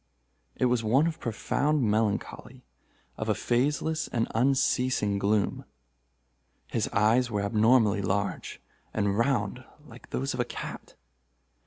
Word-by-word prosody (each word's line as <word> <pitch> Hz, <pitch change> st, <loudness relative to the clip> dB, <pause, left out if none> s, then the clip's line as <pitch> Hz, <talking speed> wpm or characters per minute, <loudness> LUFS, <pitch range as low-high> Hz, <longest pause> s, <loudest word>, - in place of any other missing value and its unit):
It -, -, +1 dB
was 120 Hz, -2 st, +1 dB
one 130 Hz, +8 st, +3 dB
of 165 Hz, -1 st, -2 dB
profound 140 Hz, +5 st, 0 dB
melancholy—of 110 Hz, +3 st, -4 dB
a -, -, +2 dB
phaseless 150 Hz, +6 st, 0 dB
and 115 Hz, -1 st, -1 dB
unceasing 125 Hz, -4 st, +1 dB
gloom. 100 Hz, 0 st, 0 dB, 1.0 s
His -, -, -2 dB
eyes 120 Hz, +4 st, +2 dB
were 105 Hz, -3 st, -1 dB
abnormally 110 Hz, 0 st, +3 dB
large, 100 Hz, +1 st, -2 dB, 0.4 s
and 100 Hz, -2 st, +1 dB
round 115 Hz, 0 st, 0 dB, 0.2 s
like 120 Hz, -4 st, -14 dB
those 135 Hz, +2 st, -2 dB
of 125 Hz, -, -6 dB
a -, -, +3 dB
cat. -, -, -8 dB
115 Hz, 120 wpm, -28 LUFS, 105-130 Hz, 1.0 s, one